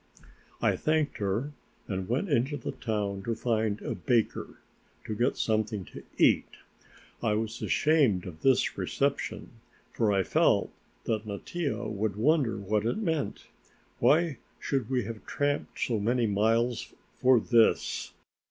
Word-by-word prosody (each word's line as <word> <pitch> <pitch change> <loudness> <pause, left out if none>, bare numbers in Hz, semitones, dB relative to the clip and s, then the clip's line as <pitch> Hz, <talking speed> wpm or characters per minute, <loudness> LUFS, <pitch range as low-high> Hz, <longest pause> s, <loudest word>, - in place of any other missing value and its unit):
I - - +3
thanked 155 -1 0
her 105 +8 -1 0.4
and 95 -1 -3
went 135 +12 0
into 140 -1 +1
the 125 - -4
town 100 -3 -2
to 115 +3 -2
find 110 -3 0
a - - -2
baker, 120 -5 0 0.5
to 110 - -3
get 120 +5 +1
something 110 -3 0
to - - -8 0.2
eat. - - +4 0.7
I 110 -3 +1
was 110 +1 -3
ashamed 140 - +3
of 85 -3 -9
this 135 -2 +2
reception, 140 0 -1 0.4
for 110 -3 +1
I 95 -1 +2
felt - - +2 0.3
that 110 -1 -2
Mattia 120 - -3
would 105 -1 -2
wonder 135 +1 +2
what 105 +1 0
it 115 - 0
meant. 165 -9 -2 0.5
Why 160 -1 +3 0.2
should 130 -5 -1
we 130 -2 +1
have 110 +1 -7
tramped 145 0 -1
so 115 -3 0
many 120 +3 +1
miles 115 +3 +1 0.2
for 130 -1 +5
this. 115 0 +2
115 Hz, 140 wpm, -29 LUFS, 105-135 Hz, 0.7 s, for